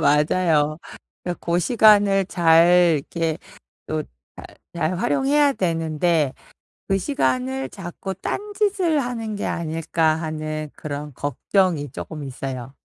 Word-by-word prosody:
맞아요. 150 +1 +2 0.4
그니까 175 -1 -4
고 170 +1 +1
시간을 205 -2 +4
잘 170 -2 +4
이렇게 165 -2 -1 0.5
또 155 -1 -2 0.3
잘 - - -9 0.3
잘 170 +1 -1
활용해야 280 +5 +2
되는데 165 - 0 0.6
'그 195 - +3
시간을 130 - -1
자꾸 190 +1 -6
딴짓을 395 - -1
하는 230 -4 -3
게 205 - -4
아닐까.' 160 -1 0
하는 155 -1 -4
그런 145 -1 -6
걱정이 145 - 0
쪼끔 155 -2 -7
있어요. 130 -1 -6
165 Hz, 240 characters per minute, -22 LUFS, 150-195 Hz, 0.6 s, 시간을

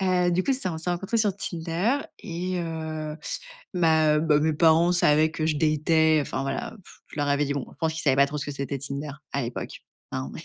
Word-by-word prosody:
heu, 180 -1 +3
du 180 +2 +2
coup, 270 - +1
c'est 255 -8 -1
on 160 - -4
s'est 160 - -5
rencontré 195 +6 -1
sur 205 -3 +1
Tinder 175 +8 -1 0.2
et, 180 0 -3
heu, 160 -2 -4 0.6
bah 160 -3 +4
bah 155 -2 +3
mes 155 0 +2
parents 165 +2 +5
savaient 155 -2 +4
que 155 0 -1
je 155 - +1
datais, 155 0 +3
enfin 135 - -3
voilà 135 +10 -3
pff. - - -17
Je - - -11
leur 145 0 0
avais 140 +1 +2
dit. 140 - -1
Bon, 140 - -3
je - - -16
pense 160 -1 0
qu'ils 160 - -5
savaient 135 -3 +4
pas 140 0 +5
trop 150 +1 -4
ce 140 - -3
que 145 - -4
c'était 140 0 -3
Tinder 140 +2 -5 0.2
à 140 - -1
l'époque 120 0 -5 0.3
hein. 65 +1 -4
160 Hz, 230 wpm, -26 LUFS, 145-175 Hz, 0.6 s, parents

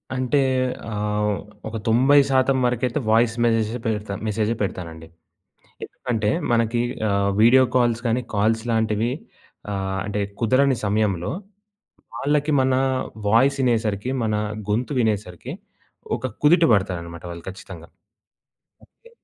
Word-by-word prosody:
అంటే 130 +2 +1 0.5
ఆహ్, 105 0 -1 0.3
ఒక 110 +1 -4
90% 135 +2 +4
వరకైతే 125 +3 0
వాయిస్ 115 +1 +3
మెసేజెస్ 115 0 +1
పెడతా. 105 -2 -2
మెసేజె 110 +1 0
పెడతానండి. 85 -5 -5 0.8
ఎందుకంటే 110 -4 -2 0.2
మనకి 115 0 +1 0.3
ఆహ్, 100 0 +1
వీడియో 120 +4 +7
కాల్స్ 120 -2 +2
కాని 120 +2 +1
కాల్స్ 110 +2 +1
లాంటివి 110 0 +1 0.6
ఆహ్, 95 -1 -2
అంటే 105 0 -2 0.2
కుదరని 130 +3 +3
సమయంలో 100 -4 0 0.8
వాళ్ళకి 150 +2 0
మన 130 0 +2 0.6
వాయిస్ 130 +6 +4
ఇనేసరికి, 110 -2 0
మన 110 -1 0 0.4
గొంతు 120 +7 -1
వినేసరికి 105 -6 -2 0.6
ఒక 130 - -4 0.2
కుదుట 165 +3 +6
పడతారన్నమాట 85 -5 -2
వాళ్ళు 85 -1 -9
ఖచ్చితంగా. 95 -3 -11 1.1
ఓకే. 470 - -19
110 Hz, 110 wpm, -22 LUFS, 105-125 Hz, 1.1 s, వీడియో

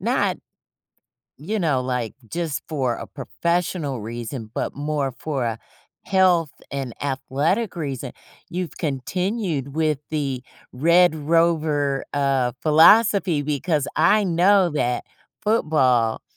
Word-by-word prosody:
not, - - 0 1.0
you 200 +10 -3
know, 155 -8 +1
like, 125 -3 -3
just 160 -5 -3
for 130 -6 0
a - - -7
professional 165 -1 -2
reason, 115 +1 -6
but - - -3
more 145 -2 -1
for 140 -5 -2
a 115 -1 -2 0.4
health 180 -5 +3 0.2
and 135 -3 -4
athletic 145 - -1
reason, 135 -5 -4 0.4
you've 180 -1 -4
continued 160 - -2
with 155 -3 +1
the 140 -5 -2 0.3
Red 170 +5 +4
Rover, 155 -3 +1
uh, 135 -3 +1
philosophy 170 +1 +5
because 150 0 -1
I 205 +6 +4
know 185 +1 +4
that 125 -5 -1 0.4
football 130 - +2
150 Hz, 110 wpm, -22 LUFS, 135-170 Hz, 1.0 s, philosophy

